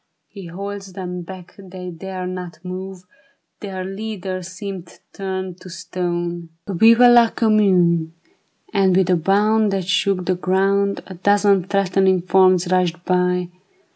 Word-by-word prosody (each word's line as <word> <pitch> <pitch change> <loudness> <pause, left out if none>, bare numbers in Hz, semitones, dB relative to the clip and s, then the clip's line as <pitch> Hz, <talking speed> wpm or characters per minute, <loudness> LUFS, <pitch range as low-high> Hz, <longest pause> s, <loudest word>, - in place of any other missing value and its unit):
He 195 -4 -10
holds 195 +2 -7
them 180 -1 -6
back, 180 0 -11
they 185 -1 -9
dare 185 +2 -6
not 180 -1 -6
move, 185 0 -7 0.6
Their 190 -2 -6
leader 195 -2 -5
seemeth 185 -1 -8
turned 190 -2 -5
to 185 - -11
stone; 175 -1 -4 0.2
Vive 225 +5 +4
la 240 -1 +6
Commune! 185 -8 +2 0.3
" - - -35
And 190 -3 +3
with 185 -1 +2
a - - +5
bound 205 +5 +2
That 190 -2 -2
shook 185 -1 +1
the 185 - +1
ground, 195 +2 0
A 190 - -9
dozen 200 0 +2
threatening 190 -2 +2
forms 185 -1 +3
rushed 180 -1 0
by. 180 -1 0
185 Hz, 140 wpm, -20 LUFS, 180-195 Hz, 0.6 s, la